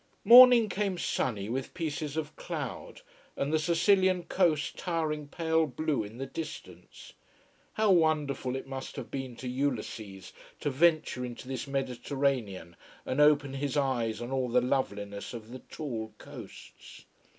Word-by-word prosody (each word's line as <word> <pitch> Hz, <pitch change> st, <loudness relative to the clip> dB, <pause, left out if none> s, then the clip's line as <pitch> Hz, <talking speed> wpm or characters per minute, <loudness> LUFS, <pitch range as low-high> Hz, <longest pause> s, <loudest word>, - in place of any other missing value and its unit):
Morning 245 Hz, -2 st, +9 dB
came 200 Hz, -2 st, -2 dB
sunny 105 Hz, -, -1 dB
with 130 Hz, +7 st, -4 dB
pieces 155 Hz, -3 st, -3 dB
of 155 Hz, -1 st, -4 dB
cloud: 150 Hz, -8 st, -6 dB, 0.4 s
and 140 Hz, +2 st, -1 dB
the 155 Hz, -, +3 dB
Sicilian 185 Hz, +3 st, +3 dB
coast 165 Hz, -5 st, +1 dB
towering 155 Hz, -4 st, -2 dB
pale 160 Hz, +1 st, +1 dB
blue 150 Hz, +1 st, -1 dB
in 105 Hz, +3 st, -10 dB
the 135 Hz, -, -4 dB
distance. 155 Hz, +3 st, -9 dB, 0.6 s
How 215 Hz, -2 st, +2 dB
wonderful 150 Hz, -7 st, +1 dB
it 135 Hz, -, -5 dB
must 135 Hz, 0 st, -7 dB
have 135 Hz, -4 st, -7 dB
been 130 Hz, -3 st, -5 dB
to 125 Hz, -, -7 dB
Ulysses 115 Hz, -7 st, -4 dB, 0.3 s
to 145 Hz, -, -1 dB
venture 155 Hz, -3 st, +2 dB
into 125 Hz, 0 st, -7 dB
this 135 Hz, +1 st, -4 dB
Mediterranean 130 Hz, -, -2 dB, 0.3 s
and 130 Hz, +3 st, 0 dB
open 145 Hz, -2 st, +4 dB
his 140 Hz, +1 st, -2 dB
eyes 120 Hz, -5 st, 0 dB
on 120 Hz, -, -6 dB
all 130 Hz, -2 st, -1 dB
the 125 Hz, +1 st, +4 dB
loveliness 100 Hz, -5 st, -2 dB
of 115 Hz, 0 st, -9 dB
the 130 Hz, -, -8 dB
tall 115 Hz, -9 st, -6 dB
coasts. -, -, -12 dB
140 Hz, 145 wpm, -29 LUFS, 125-160 Hz, 0.6 s, Morning